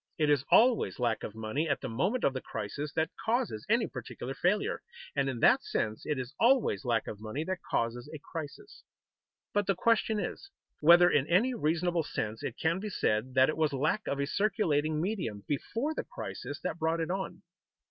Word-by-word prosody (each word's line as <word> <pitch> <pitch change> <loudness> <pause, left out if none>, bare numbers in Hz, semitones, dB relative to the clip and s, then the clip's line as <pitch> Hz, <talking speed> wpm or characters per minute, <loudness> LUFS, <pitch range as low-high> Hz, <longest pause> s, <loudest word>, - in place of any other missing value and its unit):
It 150 -2 +3
is 140 -2 +3
always 245 0 +4
lack 120 -3 0
of 105 - -6
money 110 +9 -2
at 145 - +1
the 130 - -3
moment 185 - 0
of 135 - +3
the 130 - -4
crisis 130 +8 -5
that 160 0 0
causes 225 - -1
any - - +3
particular 130 +2 -6
failure, 195 +8 0 0.3
and 140 -1 +1
in 120 -3 -4
that - - +6
sense 110 0 -2
it 150 - 0
is 130 +2 -5
always 250 - +3
lack 115 -2 +1
of 105 - -7
money 110 +8 -3
that 185 +2 -3
causes 120 +1 -1
a 155 - -6
crisis. 155 - -8 0.7
But 205 -1 +1
the 195 - +2
question 220 +2 +2
is, 395 - -5 0.3
whether 170 +3 +7
in 145 0 +2
any 220 +9 +3
reasonable 170 -3 +1
sense 110 -7 -4
it - - -4
can 165 +3 +1
be 210 +2 -4
said 125 - 0
that 130 0 +6
it 155 - -2
was 155 -2 +1
lack 155 +10 0
of 140 - -1
a 140 - +1
circulating 155 -5 +1
medium 165 - -2
before 230 - -2
the - - -3
crisis - - -6
that - - -3
brought 160 +1 +1
it 165 +1 -1
on. 190 0 -4
155 Hz, 200 wpm, -30 LUFS, 130-190 Hz, 0.7 s, whether